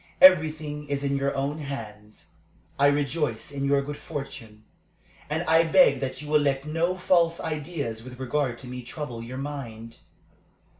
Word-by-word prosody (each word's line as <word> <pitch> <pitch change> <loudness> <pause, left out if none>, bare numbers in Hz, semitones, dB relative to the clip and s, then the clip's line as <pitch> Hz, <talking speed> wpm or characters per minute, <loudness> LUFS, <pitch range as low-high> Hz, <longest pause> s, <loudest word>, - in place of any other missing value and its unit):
Everything 155 -4 +5
is 140 0 -1
in 140 0 0
your 140 0 0
own 140 +3 -2
hands. 110 -7 -8 0.5
I 140 - +6
rejoice 145 -3 0
in 140 -1 -3
your 140 0 +3
good 145 +1 -6
fortune, 135 -8 -8 0.7
and 160 +3 -1
I 165 0 +5
beg 215 - +5
that 135 +2 -4
you - - -8
will 150 0 +4
let 140 -1 0
no 165 +4 0
false 170 -2 +3
ideas 150 -7 -4
with 125 0 -10
regard 130 -1 -1
to 130 - -8
me 125 0 -6
trouble 125 -1 -6
your 125 +3 -7
mind. 115 -5 -6
140 Hz, 160 wpm, -26 LUFS, 130-155 Hz, 0.7 s, I